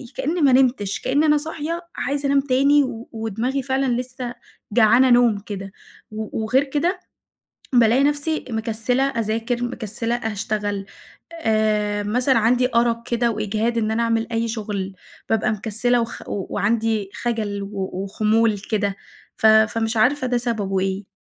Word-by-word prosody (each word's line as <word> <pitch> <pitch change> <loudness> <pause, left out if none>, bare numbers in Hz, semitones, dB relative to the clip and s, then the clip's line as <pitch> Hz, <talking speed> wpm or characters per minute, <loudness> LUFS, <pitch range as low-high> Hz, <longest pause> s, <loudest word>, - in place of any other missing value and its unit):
كأني 330 +5 -1
ما 280 -3 +5
نمتش، 250 -6 +2
كأن 285 +4 +1
أنا 300 -1 +4
صاحية 320 +2 -4
عايزة 280 +1 -2
انام 275 0 +3
تاني 280 +2 +3
و 240 -3 -6
ودماغي 225 +4 -2
فعلًا 270 0 0 0.2
لسه 250 -1 -6 0.4
جعانة 235 +3 +5
نوم 240 -3 +5
كده، 195 -1 -7 0.4
و 215 0 -4
وغير 255 +5 +3
كده 295 +7 -1 0.7
بالاقي 240 +2 +5
نفسي 295 +2 0
مكسلة 225 +3 0
أذاكر، 230 -1 -1
مكسلة 235 -1 -3
أشتغل، 210 -3 -3 0.5
آآ 215 -7 0
مثلًا 250 +5 +2
عندي 245 +3 +2
أرق 235 0 +2
كده 235 0 +1
وإجهاد 215 +2 -1
إن 220 -1 0
أنا 230 +1 +1
أعمل 230 0 0
أي 230 0 0
شغل، 205 -4 -4 0.3
بابقي 220 -1 +1
مكسلة 225 +3 0
وخ 230 0 -6
و 195 -2 -3
وعندي 220 -1 0
خجل 215 -4 -2
و 195 -1 -4
وخمول 215 +2 +1
كده، 205 -1 -1 0.4
ف - - -1
فمش 220 +1 +3
عارفة 255 +4 +2
ده 245 0 +1
سببه 215 -5 -1
إيه. 190 +1 -2
230 Hz, 145 wpm, -22 LUFS, 215-255 Hz, 0.7 s, ما